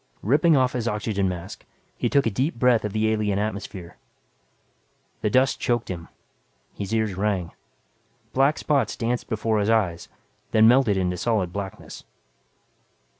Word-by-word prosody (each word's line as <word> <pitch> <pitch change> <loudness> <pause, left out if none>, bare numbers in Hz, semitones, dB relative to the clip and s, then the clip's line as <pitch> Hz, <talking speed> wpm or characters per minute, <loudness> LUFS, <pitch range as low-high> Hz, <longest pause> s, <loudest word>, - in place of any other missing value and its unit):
Ripping 150 - +4
off 130 -1 +2
his 120 -2 -2
oxygen 105 -3 -1
mask, 90 +1 -7 0.3
he - - -1
took 140 - +3
a 115 - +1
deep 130 +9 -1
breath 120 -1 +3
of 105 - -3
the 110 +1 +1
alien 105 -2 0
atmosphere. 100 -4 -5 1.2
The 105 - +1
dust 130 +5 +2
choked 120 -1 -1
him, 85 -2 -7 0.7
his 100 0 -6
ears 110 -3 0
rang. 95 -3 -1 0.8
Black 135 +3 +3
spots 145 -3 0
danced 120 +1 -2
before 110 -1 0
his 105 +1 0
eyes, 95 -7 0 0.4
then 110 0 +6
melted 120 -4 +4
into 90 -1 -1
solid 95 -4 0
blackness. 100 -2 -7
110 Hz, 145 wpm, -24 LUFS, 100-120 Hz, 1.2 s, then